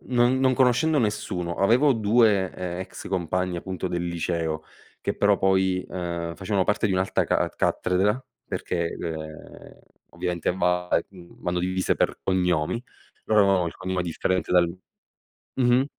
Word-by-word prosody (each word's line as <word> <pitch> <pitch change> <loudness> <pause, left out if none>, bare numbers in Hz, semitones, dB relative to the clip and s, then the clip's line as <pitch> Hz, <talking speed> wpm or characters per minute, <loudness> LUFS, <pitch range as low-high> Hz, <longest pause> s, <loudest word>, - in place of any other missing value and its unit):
non 125 +1 +3
non 130 -1 +4
conoscendo 135 +5 +3
nessuno, 95 -6 -1
avevo 120 +10 +4
2, 110 -4 +3
ehm, 90 0 -5
ex 95 - -8
compagni, 90 0 -1
appunto, 95 +1 -4
del 85 -1 -2
liceo 80 -2 -2 0.4
che, - - -2
però, 100 -1 +3
poi, 95 -1 +2
ehm, 85 -2 -4
facevano 95 0 0
parte 105 +3 +1
di - - 0
un'altra 95 +1 +1
ca - - +1
cattedra 100 +6 +1 0.3
perché, 85 -2 -2
ehm, 80 -2 -8 0.3
ovviamente, 90 -2 -2
va 90 0 +1 0.2
ehm, 90 -3 -15
vanno 90 0 -1
divise 95 +1 0
per - - 0
cognomi, 90 +2 0 0.4
loro 105 -1 +4
avevamo 95 -3 +3
il - - -11
cognome 95 -1 -2
differente 90 +2 -1
dal 90 -1 +5 0.9
mh-mh. 125 0 +3
95 Hz, 145 wpm, -25 LUFS, 90-105 Hz, 0.9 s, dal